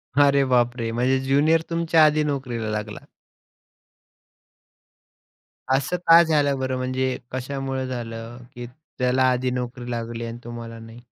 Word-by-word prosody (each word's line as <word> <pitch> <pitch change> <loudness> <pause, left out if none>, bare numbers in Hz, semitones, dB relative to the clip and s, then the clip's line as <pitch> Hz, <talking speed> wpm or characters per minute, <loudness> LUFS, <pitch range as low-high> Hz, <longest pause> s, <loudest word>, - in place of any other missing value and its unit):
अरे 140 -1 +5
बापरे! 120 -2 +1
म्हणजे 125 +3 +1
ज्युनियर 145 +5 +3
तुमच्या 165 -1 +3
आधी 155 0 +3
नोकरीला 130 -6 -3
लागला? 105 0 -4 2.8
असं 140 +6 -1
का 165 +1 +9
झालं 145 -4 +1
बरं? 130 -1 -2
म्हणजे 130 0 -1
कशामुळं 135 0 -3
झालं? 115 -2 -6 0.2
की 120 0 -7 0.3
त्याला 125 +1 +2
आधी 125 0 0
नोकरी 125 0 -5
लागली 115 0 -4
आणि 115 0 -6
तुम्हाला 115 -1 -8
नाही? 115 +1 -12
130 Hz, 125 wpm, -23 LUFS, 120-140 Hz, 2.8 s, का